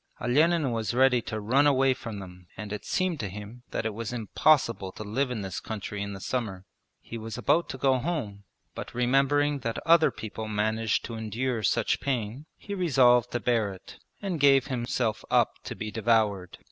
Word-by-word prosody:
Olenin 150 +3 +2
was 115 -1 -2
ready 130 -1 +4
to 110 -1 -5
run 130 +8 +3
away 135 -1 +4
from 115 -5 -7
them 90 -2 -11
and 105 +1 -6
it 105 - -6
seemed 185 -4 0
to 105 -5 -3
him 105 +5 -9
that - - -3
it 110 - -1
was 115 +1 -5
impossible 115 -3 +2
to 105 - -8
live 125 +6 -1
in 120 -4 -3
this 95 -2 -4
country 105 -1 -5
in 100 0 -4
the 95 - -7
summer. 95 -5 -3 0.3
He 115 - -8
was 110 0 -6
about 165 +7 +2
to 135 - -5
go 130 -1 +2
home, 120 -10 -3 0.3
but - - -8
remembering 140 +4 +2
that 115 -2 -3
other 165 0 +6
people 110 0 -7
managed 110 +1 0
to 115 - -6
endure 115 +2 -2
such 105 - +1
pain 125 +2 -3
he 200 - -7
resolved 125 - +4
to 120 - 0
bear 115 -4 +1
it 95 - -12 0.2
and 185 -5 -2
gave 135 -2 +5
himself 120 -4 -2
up - - +2
to - - -5
be 110 0 -5
devoured. 105 -5 +1
115 Hz, 190 wpm, -27 LUFS, 105-135 Hz, 0.3 s, other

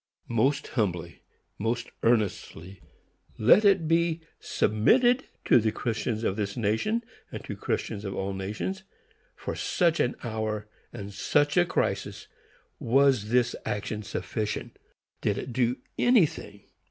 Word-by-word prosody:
Most 135 +5 +2
humbly, 85 -7 -2 0.4
most 115 +3 -2
earnestly, 100 -5 -1 0.6
let 125 - +6
it 195 -5 +4
be 165 0 +2 0.2
submitted 240 - +3 0.2
to - - +6
the 110 -1 +1
Christians 115 -1 -2
of 95 - 0
this 100 0 -3
nation, 120 - 0 0.3
and - - -6
to - - -5
Christians 105 -1 -3
of 95 -2 -4
all 95 0 -2
nations, 105 - -4 0.5
for - - -5
such 170 -2 +1
an 125 - +1
hour 110 -2 -3 0.3
and 100 0 -8
such 145 +8 +1
a 175 - +5
crisis - - -2 0.5
was 130 -3 +3
this 125 0 +2
action 105 +1 -3
sufficient? 105 +1 -4 0.5
Did - - 0
it 125 - -5
do 125 0 +1 0.2
anything? 235 - +2
115 Hz, 130 wpm, -27 LUFS, 105-155 Hz, 0.6 s, let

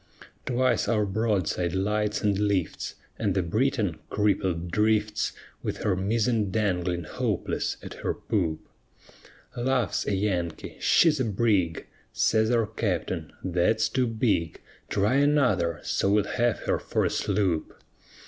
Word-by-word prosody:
Twice 125 -3 +1
our 105 -2 +2
broadside 95 -4 0
lights 105 +2 0
and 105 -1 +2
lifts, 100 -5 -1 0.2
And 100 -4 0
the 95 - +2
Briton, 105 - 0
crippled, 95 -5 0
drifts 105 +1 +1 0.3
With - - -4
her 100 - +2
mizzen 110 +2 +1
dangling 90 -4 0
hopeless - - -2
at - - -7
her - - -1
poop: 85 -8 -2 0.9
Laughs 125 -4 0
a 100 - +1
Yankee, 90 -5 -2
She's 155 -4 +4
a 130 - +1
brig! 100 -6 +1 0.3
Says 110 0 +2
our 115 -2 +3
Captain, 95 -7 -2
_That's 105 +5 +1
too 130 -1 +2
big; 110 -8 0 0.3
Try 105 +6 +2
another, 125 - +2
so 95 - 0
we'll 105 0 +4
have 120 +3 0
her - - 0
for - - -1
a - - 0
sloop! 90 -7 -1
105 Hz, 130 wpm, -27 LUFS, 90-115 Hz, 0.9 s, She's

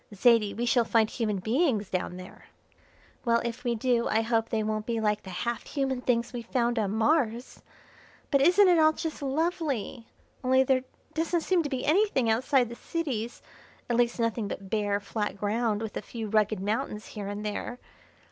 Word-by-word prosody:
Zaidie, 220 -1 +4
we 240 - 0
shall 240 0 +3
find 225 -1 +3
human 215 -4 -1
beings 220 - 0
down 180 -1 -2
there." 185 0 -12 0.8
"Well, 235 -2 +3
if 235 +1 -4
we 240 -1 0
do 235 0 +1
I 220 - +2
hope 225 0 0
they 220 -1 0
won't 215 0 -2
be 230 -1 0
like 210 -1 +1
the 190 - -10
half 235 +6 -3
human 265 -3 -1
things 240 -1 0
we 240 - -4
found 235 0 0
on 205 -3 0
Mars! 235 +2 0 0.7
But 275 -2 +4
isn't 365 +7 +6
it 350 -2 +5
all 310 0 +5
just 320 -1 -5
lovely! 280 - -2 0.4
Only 260 +1 +4
there 260 -1 +1 0.3
doesn't 330 +1 0
seem 365 +1 +2
to 295 - -3
be 260 -2 -3
anything 305 - +3
outside 250 +1 +2
the 235 - -7
cities, 245 -8 -4 0.5
at - - +2
least 240 0 +1
nothing 230 -2 0
but 195 -1 -7
bare, 205 -2 +1
flat 205 0 -3
ground 215 +1 0
with 220 - -6
a - - -2
few 225 -2 -6
rugged 215 -1 +2
mountains 210 +2 -2
here 205 -2 -6
and 205 +1 -5
there. 210 +3 -4
235 Hz, 185 wpm, -28 LUFS, 215-265 Hz, 0.8 s, isn't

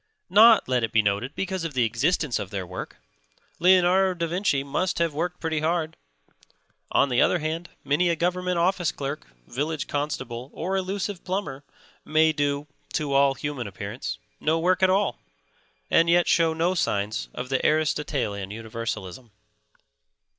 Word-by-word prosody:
Not, 220 +3 +7
let 125 -2 +1
it 115 - -1
be 110 -1 +3
noted, 105 +8 -1
because 190 -2 -3
of 160 -4 -5
the 125 - +3
existence 120 +3 0
of 100 - -5
their 95 -2 -4
work. 90 +1 -7 0.6
Leonardo 185 +1 +4
da 170 - 0
Vinci 170 -5 0
must 150 +7 -1
have 170 -2 +1
worked 175 +4 -3
pretty 160 -2 -1
hard; 160 0 -1 1.0
on 140 - +3
the 125 - +2
other - - +4
hand, 165 +2 -4
many 150 +6 +2
a 170 - +2
government 180 +2 -1
office 175 0 +1
clerk, 140 +1 -5 0.2
village 150 +4 -3
constable 130 -4 -4
or 185 +4 -2
elusive 195 0 -3
plumber 180 -8 -3 0.4
may 155 +1 +3
do 145 -1 -1 0.3
(to 145 -2 -1
all 135 0 +4
human 135 -3 -4
appearance) 100 +5 -5 0.2
no 160 +2 +1
work 180 +3 +1
at 185 - +5
all, 195 +1 +1 0.7
and 165 0 +4
yet 175 +1 +4
show 165 -1 +3
no 165 +3 +1
signs 100 - -1
of 125 +1 -5
the 135 - 0
Aristotelian 145 -10 0
universalism. 110 0 -6
155 Hz, 155 wpm, -25 LUFS, 125-175 Hz, 1.0 s, Not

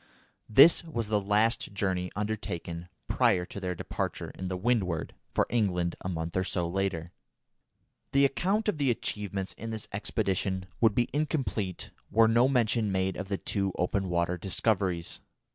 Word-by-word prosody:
This 140 +12 +7
was 120 -10 -4
the 105 -1 +2
last 105 +2 +1
journey 95 -2 -1
undertaken 90 -5 -4 0.2
prior 90 -2 +3
to 100 - -8
their 90 -2 -3
departure - - -4
in 95 - -6
the 90 0 -2
Windward 95 -6 0 0.2
for - - +2
England 90 -7 0
a 95 - -3
month 80 -1 -3
or 95 - +2
so 90 -2 -1
later. 90 -2 -2 1.0
The 140 0 +5
account 195 +10 +1
of 205 -8 0
the 140 -2 +2
achievements 100 -4 -2
of 115 - -5
this 110 -1 -4
expedition 95 -2 -1
would 110 -3 +4
be 120 - +2
incomplete 135 - -2 0.2
were 110 +1 +5
no 120 +3 +4
mention 115 -4 +2
made 95 0 0
of 95 - -5 0.2
two 95 -2 0
open 95 +1 0
water 85 +1 0
discoveries. 95 -2 0
100 Hz, 155 wpm, -29 LUFS, 90-115 Hz, 1.0 s, This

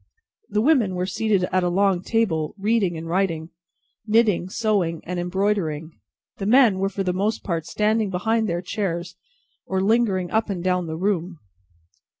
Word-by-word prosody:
The 210 +1 +1
women 245 -10 +3
were 180 0 -1
seated 210 0 0
at 185 - +2
a 175 - +1
long 190 0 +2
table, 185 -8 0
reading 200 -4 +1
and 165 +1 -6
writing, 170 -2 -1 0.6
knitting, 210 -5 +2
sewing, 190 -7 0
and 180 +1 -4
embroidering; 175 -4 -1 0.5
the 195 - -3
men 230 -5 +5
were 195 0 +1
for 195 0 -3
the 180 -1 0
most 205 +4 -1
part 165 -4 -3
standing 215 0 +1
behind 220 +4 0
their 170 +1 -2
chairs, 180 -2 -3 0.5
or 190 - -1
lingering 195 -3 +1
up 220 0 +1
and 180 -3 -3
down 180 -2 0
the 160 0 -4
room. 180 -2 -1
190 Hz, 160 wpm, -23 LUFS, 175-215 Hz, 0.6 s, men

